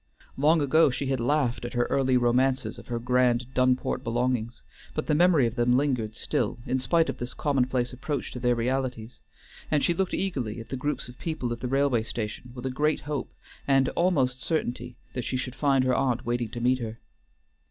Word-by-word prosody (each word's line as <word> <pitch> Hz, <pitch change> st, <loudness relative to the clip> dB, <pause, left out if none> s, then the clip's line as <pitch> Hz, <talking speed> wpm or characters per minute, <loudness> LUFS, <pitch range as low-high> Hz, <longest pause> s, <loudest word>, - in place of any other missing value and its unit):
Long 155 Hz, +4 st, +4 dB
ago 150 Hz, +2 st, +4 dB
she 135 Hz, +2 st, -3 dB
had 135 Hz, -2 st, 0 dB
laughed 125 Hz, -1 st, +1 dB
at 120 Hz, -, -5 dB
her 120 Hz, 0 st, +2 dB
early 130 Hz, -2 st, +3 dB
romances 130 Hz, +2 st, +1 dB
of -, -, -14 dB
her 120 Hz, -, -2 dB
grand 125 Hz, 0 st, +2 dB
Dunport 130 Hz, 0 st, +1 dB
belongings, 120 Hz, 0 st, -1 dB, 0.3 s
but -, -, -1 dB
the -, -, +1 dB
memory 165 Hz, -4 st, +5 dB
of 115 Hz, -, -1 dB
them 125 Hz, 0 st, +3 dB
lingered 125 Hz, -6 st, 0 dB
still, -, -, -1 dB
in 130 Hz, -, 0 dB
spite 160 Hz, +6 st, +2 dB
of -, -, -4 dB
this 120 Hz, +1 st, -4 dB
commonplace 130 Hz, -3 st, 0 dB
approach 140 Hz, +2 st, -4 dB
to 125 Hz, -, -6 dB
their 125 Hz, 0 st, +2 dB
realities, 125 Hz, -1 st, -2 dB, 0.5 s
and 150 Hz, -2 st, +2 dB
she 175 Hz, -, +3 dB
looked 185 Hz, +2 st, -1 dB
eagerly 130 Hz, -, -2 dB
at 115 Hz, -, -10 dB
the -, -, -3 dB
groups 145 Hz, +3 st, -2 dB
of 125 Hz, 0 st, -13 dB
people 155 Hz, -8 st, -2 dB
at 120 Hz, -, -7 dB
the 125 Hz, -, -3 dB
railway 135 Hz, -2 st, +2 dB
station 115 Hz, +2 st, -5 dB
with 125 Hz, 0 st, -7 dB
a 130 Hz, -, -1 dB
great 150 Hz, +4 st, +1 dB
hope 145 Hz, -3 st, -4 dB, 0.4 s
and 135 Hz, -1 st, +4 dB
almost 135 Hz, -8 st, +1 dB
certainty 125 Hz, -7 st, -2 dB, 0.2 s
that 125 Hz, -, -3 dB
she 130 Hz, -, -2 dB
should 125 Hz, -1 st, -4 dB
find 135 Hz, -1 st, +2 dB
her 130 Hz, 0 st, +2 dB
aunt 125 Hz, -2 st, 0 dB
waiting 120 Hz, -1 st, -1 dB
to 120 Hz, +2 st, -6 dB
meet 125 Hz, +2 st, +2 dB
her. 115 Hz, -1 st, -5 dB
125 Hz, 205 wpm, -27 LUFS, 120-140 Hz, 0.5 s, memory